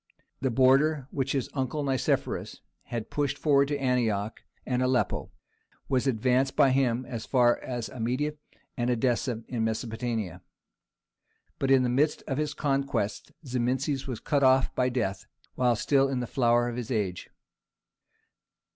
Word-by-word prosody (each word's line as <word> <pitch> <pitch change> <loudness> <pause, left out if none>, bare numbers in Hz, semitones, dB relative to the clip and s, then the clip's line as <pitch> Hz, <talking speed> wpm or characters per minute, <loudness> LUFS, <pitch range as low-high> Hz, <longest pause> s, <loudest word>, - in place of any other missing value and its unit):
The 130 - 0
border 135 +3 +3
which 135 -1 -1
his 135 -3 -1
uncle 140 +2 -2
Nicephorus 135 -3 -1 0.2
had 115 -2 -5
pushed 145 -2 -1
forward 140 -2 +3
to 145 0 -1
Antioch 115 -6 0 0.2
and 125 -1 0
Aleppo 125 -5 0 0.6
was 130 0 +1
advanced 130 +2 +1
by 140 -3 +5
him 130 -2 +1
as 120 -3 -6
far 120 -2 +3
as 120 -3 -4
Amida 130 +4 -2 0.4
and 120 0 -1
Edessa 120 -1 0
in 120 -3 -2
Mesopotamia. 110 -3 -3 1.2
But 135 - 0
in 135 -1 +5
the 125 - +1
midst 145 +5 +1
of 135 0 -2
his 150 -1 -2
conquests 135 -8 -1
Zimisces 130 +2 -1
was 125 -4 -4
cut 145 -2 0
off 130 0 +4
by 125 0 +1
death, 115 -6 -2 0.3
while 125 -2 +2
still 135 +4 +2
in 135 -2 -1
the 125 - -2
flower 120 -1 +2
of 120 0 -4
his 120 -3 -5
age. 100 -7 -2
125 Hz, 145 wpm, -28 LUFS, 120-135 Hz, 1.2 s, by